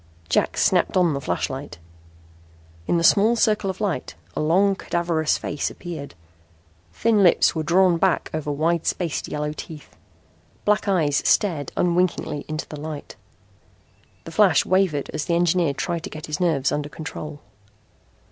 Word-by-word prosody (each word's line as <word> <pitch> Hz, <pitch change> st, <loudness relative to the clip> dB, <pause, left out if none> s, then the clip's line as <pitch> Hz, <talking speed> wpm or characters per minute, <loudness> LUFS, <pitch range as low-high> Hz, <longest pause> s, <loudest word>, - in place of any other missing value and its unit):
Jack -, -, +1 dB
snapped -, -, +2 dB
on 175 Hz, -4 st, +3 dB
the 140 Hz, -, -3 dB
flash. -, -, -1 dB
In 85 Hz, -, -8 dB
the 165 Hz, -, 0 dB
small 215 Hz, +6 st, +5 dB
circle 215 Hz, -3 st, +1 dB
of 190 Hz, -, -5 dB
light 200 Hz, -6 st, -2 dB, 0.2 s
a -, -, -1 dB
long, 190 Hz, +6 st, +3 dB
cadaverous 170 Hz, -4 st, 0 dB
face 145 Hz, -, -3 dB
appeared. 160 Hz, -, -8 dB, 0.8 s
Thin 220 Hz, -, +2 dB
lips 180 Hz, -3 st, +5 dB
were 160 Hz, -, -2 dB
drawn 175 Hz, +2 st, +3 dB
back 190 Hz, -1 st, +1 dB
over 155 Hz, -1 st, -2 dB
wide 160 Hz, +3 st, 0 dB
spaced 170 Hz, -5 st, -2 dB
yellow 150 Hz, 0 st, -3 dB
teeth. 155 Hz, -1 st, -10 dB, 0.7 s
Black 210 Hz, +1 st, +2 dB
eyes 155 Hz, -7 st, +2 dB
stared 165 Hz, -, +1 dB
unwinkingly 175 Hz, -4 st, 0 dB
into 155 Hz, 0 st, -4 dB
the 150 Hz, -, -8 dB
light. 150 Hz, -1 st, -7 dB, 1.1 s
The 165 Hz, -, -9 dB
flash 180 Hz, -2 st, +4 dB
wavered 185 Hz, -6 st, +1 dB
as 155 Hz, -, -2 dB
the 170 Hz, -, 0 dB
engineer 170 Hz, -3 st, +2 dB
tried 170 Hz, +2 st, -2 dB
to -, -, -6 dB
get 155 Hz, 0 st, -8 dB
his 150 Hz, +3 st, -4 dB
nerves 160 Hz, -7 st, +1 dB
under 145 Hz, 0 st, -2 dB
control. 150 Hz, -1 st, -7 dB
160 Hz, 150 wpm, -23 LUFS, 145-180 Hz, 1.1 s, small